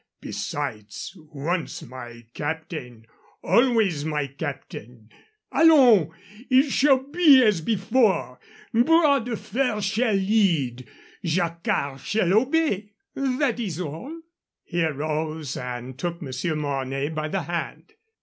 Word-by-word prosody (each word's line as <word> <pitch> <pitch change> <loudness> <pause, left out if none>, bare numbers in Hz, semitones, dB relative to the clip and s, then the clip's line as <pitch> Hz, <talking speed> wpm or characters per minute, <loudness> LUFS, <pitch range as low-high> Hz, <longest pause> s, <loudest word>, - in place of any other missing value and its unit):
Besides, 105 - -5
once 155 +1 -4
my 120 -2 -10
captain, 145 -7 -5 0.4
always 225 - +3
my 150 -2 -1
captain. 125 -5 -8 0.4
Allons! 250 - +6 0.4
It 265 +2 +4
shall 275 +1 +5
be 285 -2 +6
as 210 -7 +3
before. 195 - +1 0.3
Bras 280 +2 +4
de 240 -2 -3
Fer 225 0 -1
shall 215 +2 +1
lead. 180 - +1 0.4
Jacquard 165 -5 -1
shall 190 -1 +1
obey. 225 -4 +1 0.2
That 265 -2 0
is 185 -8 -3
all." 185 - -6 0.4
He 170 -1 -1
arose 155 -1 -2
and 125 0 -6
took 170 +1 -3
Monsieur 145 +3 -3
Mornay 135 -1 -2
by 155 -1 -3
the 185 +3 -2
hand. 170 0 -5
170 Hz, 110 wpm, -24 LUFS, 145-230 Hz, 0.4 s, Allons